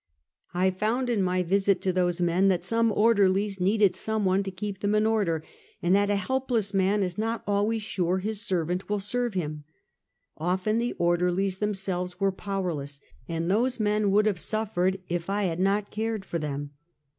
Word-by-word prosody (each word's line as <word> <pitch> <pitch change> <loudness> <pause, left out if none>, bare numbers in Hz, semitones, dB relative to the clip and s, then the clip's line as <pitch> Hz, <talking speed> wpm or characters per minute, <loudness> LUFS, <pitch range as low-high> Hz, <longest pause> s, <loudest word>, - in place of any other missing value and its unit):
I 185 +1 +3
found 230 +7 -1
in 220 -4 +1
my 185 0 +1
visit 195 +1 +2
to 185 - 0
those 175 -1 +1
men 175 +2 +2
that 185 -3 +2
some 230 0 +2
order 210 -3 +4
lies 195 +1 -1
needed 200 0 +3
some 220 -2 -1
one 190 +1 +3
to 195 - -4
keep 195 +1 -5
them 205 +1 +1
in 215 0 +3
order, 200 -8 +1 0.4
and 175 +1 +2
that 200 +1 +3
a 205 - +2
helpless 230 0 -1
man 195 +1 +2
is 180 +1 -3
not 225 +1 -2
always 210 +2 0
sure 185 -3 0
bis 215 +1 -2
servant 180 -3 -1
will 210 0 0
serve 240 +2 -2
him. 155 -4 -3 0.8
Often 185 +6 0
the 240 +1 -1
orderlies 180 +2 +1
themselves 190 -3 -2
were 195 -1 +2
powerless, 175 -8 -4 0.3
and 165 +1 -1
those 240 +4 +1
men 210 -1 +2
would 210 +2 +4
have 205 -5 +1
sufiered 195 -4 -1
if 175 +1 -3
I 205 +1 0
had 175 -3 -1
not 200 +2 +1
cared 220 -2 -2
for 170 - -3
them. 145 -1 -4
195 Hz, 185 wpm, -27 LUFS, 180-210 Hz, 0.8 s, order